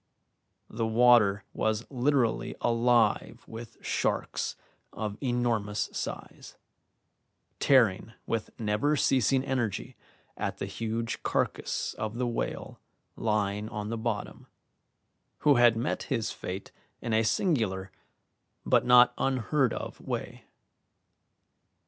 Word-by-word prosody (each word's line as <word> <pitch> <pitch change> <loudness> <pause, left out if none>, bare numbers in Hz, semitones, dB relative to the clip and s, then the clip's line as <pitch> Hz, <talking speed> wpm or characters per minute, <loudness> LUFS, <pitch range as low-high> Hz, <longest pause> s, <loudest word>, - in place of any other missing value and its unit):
The 115 0 -2
water 110 -4 +5
was 110 +1 -1
literally 130 -2 +1
alive 115 -2 +2
with 115 0 -9
sharks - - -1 0.4
of 105 -1 -4
enormous 120 -5 0
size, - - -6 1.0
tearing 115 -5 +3
with 115 -1 -2
never 110 +7 +1
ceasing 130 -1 +2
energy 125 -6 -2 0.4
at - - -3
the - - -3
huge 115 0 -3
carcass - - -1
of 110 +1 -3
the 125 - 0
whale 120 -1 -4 0.4
lying 105 -1 -1
on 105 0 -5
the 115 - -2
bottom, 110 -2 -4 0.9
who 145 -3 +5
had 120 -2 +5
met 120 +6 -1
his 115 -5 -1
fate 95 +2 -6 0.3
in 115 - -3
a 110 - +4
singular 110 - 0 0.7
but - - +4
not 125 0 +7
unheard 135 0 +1
of - - -6
way. - - -5
115 Hz, 105 wpm, -29 LUFS, 105-125 Hz, 1.0 s, not